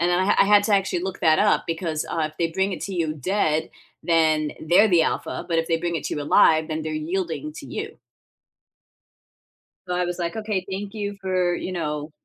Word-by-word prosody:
And 175 +1 +2
then 175 - +2
I 190 - +2
I - - +3
had 205 0 +5
to 210 -2 +3
actually 190 -3 0
look 190 0 -5
that 155 -1 +4
up 210 - +3
because, 165 -2 -2
uh, 155 -2 -1
if 155 - -26
they 165 -1 0
bring 190 +3 0
it - - -5
to 195 - -4
you 160 -3 -1
dead, 160 0 0 0.3
then 155 -2 +2
they're 180 +7 +4
the 170 -3 +4
alpha. - - -2
But 165 - +1
if 165 - 0
they 165 - +1
bring 170 0 -2
it 150 - -5
to - - -2
you 150 - -3
alive, 155 +2 +4
then 155 0 -3
they're 155 0 -4 0.2
yielding 190 - -3
to - - -9
you. - - -6 1.9
So, 180 - -2
I 180 0 +1
was, 175 +1 -4
like, 170 +1 -3
okay, 210 -4 -2
thank 200 +2 -5
you 205 -2 -4
for, 185 -2 0
you 185 - -4
know? 150 -3 -3
175 Hz, 225 wpm, -23 LUFS, 160-190 Hz, 1.9 s, had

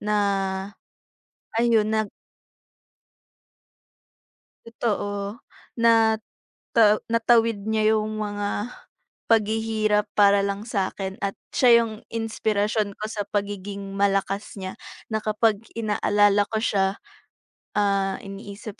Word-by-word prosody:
na, 210 0 0 1.4
ayun, 230 -2 +3
nag 220 -1 0 2.6
Totoo. 205 -2 -3 0.4
Nata 225 -1 +2
natawid 230 -2 +3
niya 220 0 +3
'yong 215 0 -2
mga 205 -1 -2 0.8
paghihirap 215 -1 +2
para 200 -1 +5
lang 200 +1 -2
sa'kin 195 -3 -3
at 200 0 -2 0.2
siya 235 -2 +6
'yong 225 -1 -5
inspirasyon 215 -2 -1
ko 215 - -5
sa 205 -1 -4
pagiging 200 -1 -4
malakas 195 +1 0
niya, 190 -1 -6 0.3
na 220 - +1
kapag 215 -1 +1 0.2
inaalala 205 -2 +2
ko 220 - -2
siya, 195 -3 +1 0.8
ah, 195 -2 +1
iniisip 200 +1 -9
210 Hz, 95 wpm, -24 LUFS, 200-220 Hz, 2.6 s, siya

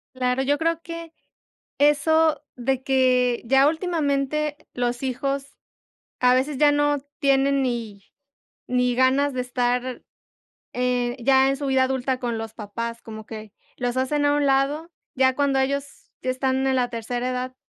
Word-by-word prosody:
Claro, 255 +1 0
yo 290 +2 +1
creo 330 +1 0
que, 335 -1 -8 0.7
eso 295 +1 +3 0.2
de 260 +1 -1
que 255 -2 +2
ya 270 +4 +4
últimamente 300 -3 -1 0.2
los 245 0 -2
hijos 275 +1 -2 0.8
a 250 0 +5
veces 265 +2 0
ya 295 0 +5
no 290 0 +2 0.2
tienen 275 -1 +2
ni 230 -5 -3 0.7
ni 250 -1 +1
ganas 265 +2 +3
de 255 - -1
estar, 250 0 -1 0.7
eh, 250 -1 0
ya 265 0 +5
en 275 - +1
su 280 0 -4
vida 265 -1 +3
adulta 260 0 -1
con 240 -2 -2
los 225 -1 -6
papás, 230 +2 -6
como 220 -1 -9
que 215 -2 -9 0.2
los 245 0 -2
hacen 290 +3 0
a 290 - +3
un 290 -1 +1
lado, 280 +5 +1 0.2
ya 260 0 +3
cuando 280 -2 +1
ellos 280 +1 -3
ya 255 - -1
están 265 +1 0
en 265 - +2
la 250 -1 +1
tercera 240 +1 -3
edad, 255 0 -4
265 Hz, 155 wpm, -23 LUFS, 250-280 Hz, 0.8 s, a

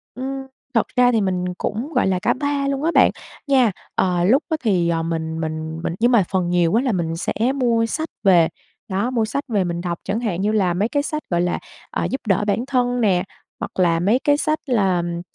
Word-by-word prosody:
Ừm, 270 +1 -5 0.3
thật 230 - +2
ra 250 -1 +5
thì 225 -3 +2
mình 185 -2 -1
cũng, 240 +12 -3
gọi 250 - +2
là, 185 -1 +1
cả - - +2
3 285 0 -1
luôn 275 +1 -1
á 330 - +2
bạn, - - +6 0.4
nha. 260 -6 +4 0.2
Ờ, 180 -2 +1
lúc 250 - +4
á 315 - 0
thì, 185 -7 +2
ờ, 165 -1 0
mình 160 -1 -3
mình 160 0 -4
mình 170 - -1
nhưng 240 +2 +3
mà 230 -5 +5
phần 180 -2 0
nhiều 175 -1 +2
á 230 - +4
là 255 - +1
mình 165 -4 -1
sẽ 170 - -2 0.2
mua 235 -3 +2
sách 315 +8 -3
về 175 -5 +5 0.4
đó, 200 +6 -1
mua 230 -3 +1
sách 280 +6 -3
về 210 -6 +1
mình 175 -1 -3
đọc 175 -1 -3
chẳng 200 +4 -2
hạn 205 -7 -2
như 210 +2 +1
là 195 -5 +2
mấy 200 +6 0
cái 285 +1 0
sách, 305 0 -3
gọi 175 -1 +1
là, 175 0 0 0.3
ờ, - - -1
giúp 265 - -3
đỡ 195 +1 +2
bản 230 +5 0
thân 245 -2 0
nè, 185 -5 +3 0.4
hoặc - - -5
là 170 -2 +3
mấy 210 +8 +2
cái 290 0 +3
sách 310 0 0
là, 200 -8 +2
ừm, 170 0 -3
205 Hz, 240 wpm, -21 LUFS, 175-250 Hz, 0.4 s, bạn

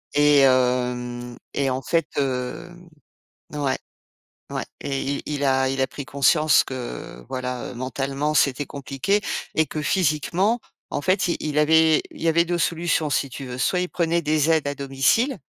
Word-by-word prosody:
et 145 0 +5
hem 125 -2 +1 0.2
et 140 -1 0
en 130 0 -2
fait, 165 +3 +1
heu, 135 +5 -2 0.8
ouais, 145 -3 0 0.7
ouais - - -3 0.2
et 135 -1 -2
i 140 +1 -2
il 145 -1 -2
a 130 -1 +3
il 135 0 -2
a - - +2
pris 140 - -7
conscience 150 +2 +4
que, 120 - -7
voilà, 125 -1 -4
heu, - - -9
mentalement, 135 +4 -2
c'était 140 -1 +2
compliqué 140 +8 -1 0.3
et 160 - +3
que 150 +2 -4
physiquement, 175 - +1 0.3
en - - -2
fait, 185 +3 +2
i 170 - +1
il 150 -1 -3
avait 160 +1 +5
il - - -13
y - - 0
avait 170 +1 +4
2 175 0 -1
solutions 165 -2 0
si 140 -1 0
tu 135 +2 -7
veux. 125 -1 -6
Soit 155 +8 +1
il 180 - -1
prenait 170 0 +1
des 155 0 +2
aides 160 -3 +2
à 145 - -2
domicile 140 - +1
140 Hz, 175 wpm, -23 LUFS, 130-160 Hz, 0.8 s, et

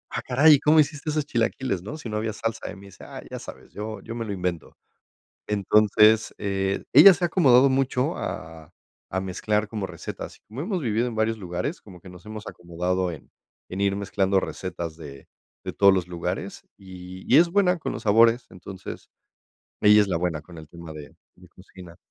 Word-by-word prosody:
"Ah, - - -3
caray, 145 +3 +6
¿cómo 155 +1 +5
hiciste 150 0 -2
esos 150 -1 -1
chilaquiles?, 115 -6 -1
¿no? 145 +10 -7
Si 135 -7 -8
no 105 - -3
había 110 0 -2
salsa". 115 +1 -4
Y - - -10
me 100 +1 -13
dice: 100 - -14
"Ah, - - -9
ya - - -5
sabes, - - -12
yo 110 0 -6
yo 115 - -7
me 115 -1 -4
lo 100 - -4
invento". 90 -3 -4 0.7
Entonces, 105 +1 +3
eh, 95 -1 -2
ella 175 +7 +9
se 175 - -3
ha - - +2
acomodado 135 -6 +5
mucho 130 -1 0
a 80 -1 -7 0.4
a 95 - -1
mezclar 105 +3 -1
como 105 -3 -4
recetas. 85 -3 -8
Como 110 +6 -8
hemos 180 -1 -2
vivido 115 +1 0
en 120 - -5
varios 110 0 0
lugares, 90 - -4
como 90 -4 -14
que 95 - -12
nos 90 +2 -15
hemos 110 0 -8
acomodado 90 +1 -3
en 75 - -12 0.4
en 95 +2 -5
ir 100 0 +1
mezclando 95 -1 0
recetas 85 -3 -6
de 70 -3 -11 0.4
de - - -4
todos 100 -1 +5
los 90 -2 -1
lugares, 85 -1 -5
y 95 -1 -11
y - - +9
es 170 +1 +5
buena 180 -2 +2
con - - -4
los - - -6
sabores. 115 +3 +4
Entonces, 95 +1 -10 0.7
ella 105 0 +7
es 100 - 0
la 90 - 0
buena 85 -3 -2
con 85 +1 -14
el 80 -1 -11
tema 85 -2 -10
de 75 -1 -11 0.2
de 90 0 -18
cocina. 90 -2 -15
100 Hz, 200 wpm, -24 LUFS, 90-120 Hz, 0.7 s, ella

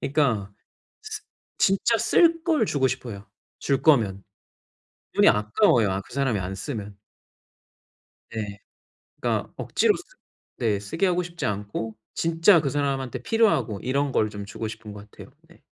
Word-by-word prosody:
그니까 125 -9 0 0.5
쓰 435 0 -6 0.4
진짜 200 +4 +3
쓸 330 -1 +4
걸 310 -10 +2
주고 135 -6 +1
싶어요 105 -6 -5 0.4
줄 140 -1 0
거면. 110 -11 +3 0.9
돈이 - - +5
아까워요 105 0 +3
아 95 - -1
그 - - -17
사람이 135 -6 +1
안 95 +1 -4
쓰면. 105 -3 -6 1.4
네. 105 -3 -5 0.6
그러니까 - - -1
억지로 - - +2
쓰 - - -8 0.6
네 105 -4 +1
쓰게 160 - -1
하고 180 -1 +2
싶지 175 0 -5
않고 105 +2 -3 0.2
진짜 165 +2 +4
그 140 - -1
사람한테 135 -3 -2
필요하고 205 - +2
이런 140 +2 0
걸 110 -3 +2
좀 100 -1 -6
주고 110 +2 -5
싶은 110 -1 -8
것 105 0 -11
같아요. - - -12
네. - - -21
125 Hz, 275 characters per minute, -25 LUFS, 105-160 Hz, 1.4 s, 돈이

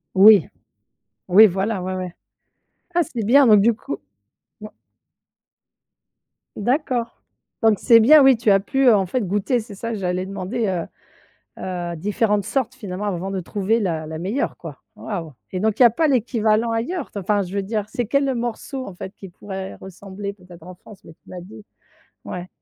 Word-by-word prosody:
Oui, 200 -3 +7 0.8
ou 185 +4 +5
i, 220 - +11
voilà, 195 +2 -2
ouais, 185 +1 -3
ouais. 185 -2 -5 0.8
Ah 345 - +3
c'est 245 -9 -5
bien 270 +6 +5
donc 210 -3 +6
du 230 +4 +4
coup 140 -9 -6 0.6
mmh. 215 - -7 1.9
D'accord, 245 0 -1 0.4
donc 220 -3 +4
c'est 230 -1 +6
bien, 290 +7 +7
oui, 270 -3 +6
tu 220 -2 +2
as 195 - +5
pu, 270 +7 -1
heu, 235 - +8
en 195 -2 0
fait, 250 +8 -1
goûter, 205 +6 0
c'est 215 -2 -9
ça 230 +3 -5
j'allais 180 -2 -2
demander, 195 +4 -3
heu, 175 -3 -2 0.8
heu, 175 -2 -4
différentes 205 +3 0
sortes, 260 -2 -2
finalement, 205 -4 -6
avant 190 -1 -3
de 195 -1 -3
trouver 205 +5 -1
la 165 -6 -2
la 160 0 -6
meilleure, 200 - -3
quoi. - - -10
Waouh, 170 -7 -6 0.2
et 185 - -3
donc 220 +1 0
il - - +8
y - - +10
a 235 - +5
pas 315 +7 +1
l'équivalent 230 -3 +1
ailleurs? 270 +8 -3
Enfin, 200 +1 0
je 185 0 -7
veux 200 - -1
dire, 210 +1 -3
c'est 240 +2 -3
quel, 280 +3 +1
heu, 265 - 0
morceau, 245 +3 -4
en 195 - -9
fait, 190 +2 -9
qui 195 - -11
pourrait 190 +1 -8
ressembler 200 +1 -8
peut-être 180 -3 -16
en 185 - -10
France? 195 +2 -16
Mais 165 - -14
tu - - -21
m'as 180 - -7
dit 205 +3 -13 0.6
ouais. 180 0 -7
205 Hz, 190 wpm, -21 LUFS, 185-235 Hz, 1.9 s, i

